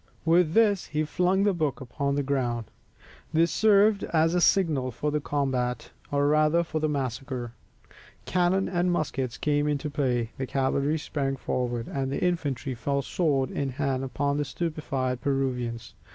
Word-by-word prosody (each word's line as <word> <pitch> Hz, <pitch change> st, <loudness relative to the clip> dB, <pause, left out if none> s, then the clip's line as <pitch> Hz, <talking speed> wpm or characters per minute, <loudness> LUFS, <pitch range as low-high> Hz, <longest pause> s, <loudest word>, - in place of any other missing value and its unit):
With 165 Hz, -1 st, +4 dB
this 210 Hz, -3 st, +3 dB
he 155 Hz, 0 st, -1 dB
flung 180 Hz, +5 st, +1 dB
the 205 Hz, -1 st, +3 dB
book 155 Hz, -6 st, -1 dB
upon 140 Hz, +2 st, -2 dB
the 145 Hz, -, 0 dB
ground. 125 Hz, -4 st, -1 dB, 0.7 s
This 165 Hz, 0 st, +3 dB
served 205 Hz, +2 st, +4 dB
as 165 Hz, 0 st, +2 dB
a 180 Hz, -, +2 dB
signal 155 Hz, -10 st, +3 dB
for 145 Hz, +5 st, -2 dB
the 150 Hz, -, 0 dB
combat, 130 Hz, -5 st, -1 dB, 0.2 s
or 145 Hz, 0 st, +2 dB
rather 155 Hz, +3 st, +3 dB
for 160 Hz, -2 st, -3 dB
the 155 Hz, 0 st, 0 dB
massacre. 130 Hz, -3 st, -3 dB, 0.7 s
Cannon 185 Hz, +2 st, +2 dB
and 180 Hz, 0 st, +1 dB
muskets 135 Hz, -7 st, -2 dB
came 145 Hz, 0 st, +1 dB
into 150 Hz, 0 st, -1 dB
play, 125 Hz, -5 st, 0 dB
the 130 Hz, -, -2 dB
cavalry 140 Hz, +3 st, 0 dB
sprang 140 Hz, -3 st, -2 dB
forward, 120 Hz, -3 st, -2 dB
and 135 Hz, -1 st, -2 dB
the -, -, -1 dB
infantry 145 Hz, -6 st, -1 dB
fell 140 Hz, +4 st, -1 dB
sword 140 Hz, -4 st, 0 dB
in 140 Hz, -, -2 dB
hand 135 Hz, 0 st, -1 dB
upon 140 Hz, +3 st, -1 dB
the 145 Hz, -, 0 dB
stupefied 135 Hz, -6 st, -3 dB
Peruvians. 125 Hz, -4 st, -2 dB
145 Hz, 160 wpm, -27 LUFS, 130-165 Hz, 0.7 s, With